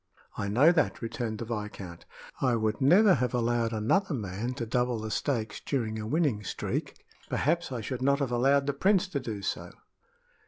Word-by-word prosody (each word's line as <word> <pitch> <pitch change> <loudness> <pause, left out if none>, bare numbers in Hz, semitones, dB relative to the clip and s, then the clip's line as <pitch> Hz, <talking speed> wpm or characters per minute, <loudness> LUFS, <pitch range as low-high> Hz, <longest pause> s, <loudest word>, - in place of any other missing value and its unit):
"I 100 - -3
know 130 +11 +5
that," 155 -7 0
returned 115 -1 -3
the 115 - -5
viscount. 105 -6 -6 0.3
"I 125 -3 +3
would 110 0 -1
never 185 +9 +6
have 125 -3 0
allowed 120 -1 +1
another 140 - +1
man 110 +3 -4
to 120 - -3
double 125 +1 0
the 110 0 -5
stakes 110 -5 -1
during 110 -6 -2
a 110 - -5
winning 140 -6 +1
streak. - - -4 0.2
Perhaps 170 +2 0
I 125 -3 -3
should 125 +3 -4
not 140 +1 +3
have 140 -3 -2
allowed 135 +3 +3
the 140 - 0
prince 190 +6 +2
to 145 - -2
do 110 -6 -5
so." - - -3
120 Hz, 185 wpm, -29 LUFS, 110-140 Hz, 0.3 s, never